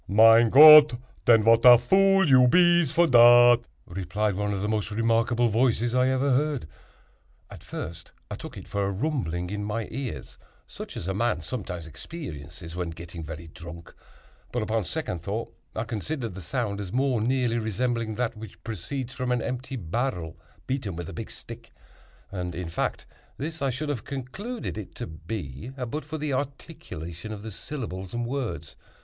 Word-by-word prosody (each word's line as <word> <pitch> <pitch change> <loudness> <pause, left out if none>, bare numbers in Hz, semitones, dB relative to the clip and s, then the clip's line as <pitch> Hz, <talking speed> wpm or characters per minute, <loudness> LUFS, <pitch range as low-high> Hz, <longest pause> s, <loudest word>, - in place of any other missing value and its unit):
"Mein 115 +3 +6
Gott, 150 +1 +10 0.3
den, 115 -2 +6
vat 115 +1 +5
a 125 -1 +10
vool 195 +8 +4
you 130 -2 +6
bees 175 0 +4
for 170 - +4
dat!" 120 -2 +7 0.3
replied 100 +3 -2
one 105 +2 -2
of 100 -1 -3
the - - 0
most 105 -1 -1
remarkable 115 +2 +1
voices 115 +1 +1
I 125 +1 +3
ever 130 +1 +1
heard. 140 - 0 0.8
At - - -11
first 85 0 -7 0.2
I - - -3
took - - -10
it - - -10
for 100 0 -2
a 100 - 0
rumbling 95 - -2
in 105 0 -3
my 105 +2 -3
ears—such 130 0 -8
as 85 - -6
a 95 - -1
man 110 -4 0
sometimes 90 -3 -5
experiences 80 - -9
when 90 -1 -3
getting 85 0 -9
very 80 +2 -8
drunk—but, 85 +7 -10
upon 110 -1 -1
second 120 - -4
thought, 105 +6 -5 0.2
I 110 - -1
considered 115 +1 -4
the 95 - -8
sound 105 0 -3
as 95 -3 -7
more 130 -2 +1
nearly 120 0 +1
resembling 115 0 -2
that 120 -1 -2
which 110 -2 -11
proceeds 120 +5 -5
from 125 0 -3
an 125 -1 0
empty 130 +1 -4
barrel 90 -4 -3 0.3
beaten 130 -9 -3
with 85 -1 -6
a - - -8
big - - -6
stick; - - -11 0.6
and, 90 -3 -4
in 85 -1 -5
fact, 85 - -3 0.3
this 160 +2 -5
I 140 - +1
should 145 +4 -4
have 135 -7 -3
concluded 140 - -6
it 105 - -10
to - - -5
be, 80 - -7
but 130 +4 -4
for 155 +1 -5
the 150 -2 -2
articulation 110 - -6
of 105 -1 -7
the 110 - -6
syllables 95 -6 -6
and 120 0 -2
words. 115 - -4
115 Hz, 170 wpm, -26 LUFS, 95-130 Hz, 0.8 s, Gott